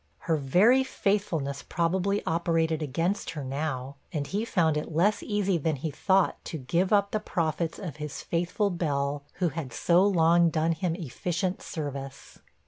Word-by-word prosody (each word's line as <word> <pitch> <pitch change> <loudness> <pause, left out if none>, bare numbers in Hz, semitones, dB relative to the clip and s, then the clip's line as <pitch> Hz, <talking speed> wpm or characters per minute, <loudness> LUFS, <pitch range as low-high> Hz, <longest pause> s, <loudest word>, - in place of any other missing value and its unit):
Her 165 - +1
very 185 - +4
faithfulness 180 - -1
probably 190 +4 0
operated 165 -1 +1
against 165 +8 -1
her 145 - -3
now, 135 -1 -3
and 145 -3 -2
he 205 +8 -2
found 165 -8 +2
it 150 +2 -3
less 195 +7 +2
easy 200 -4 0
than 160 0 0
he 150 +3 -4
thought 190 +5 +1
to 160 - -4
give 170 +8 0
up 200 -1 +3
the 215 - 0
profits 165 -3 -1
of 170 -8 -6
his 150 -1 -6
faithful 180 +4 0
Bell, 145 -4 -1
who 180 -2 0
had 140 -3 -5
so 170 +8 +3
long 170 -3 +4
done 160 +1 +1
him 165 +1 -1
efficient 180 +3 -3
service. 140 -3 -6
165 Hz, 160 wpm, -28 LUFS, 150-190 Hz, -, very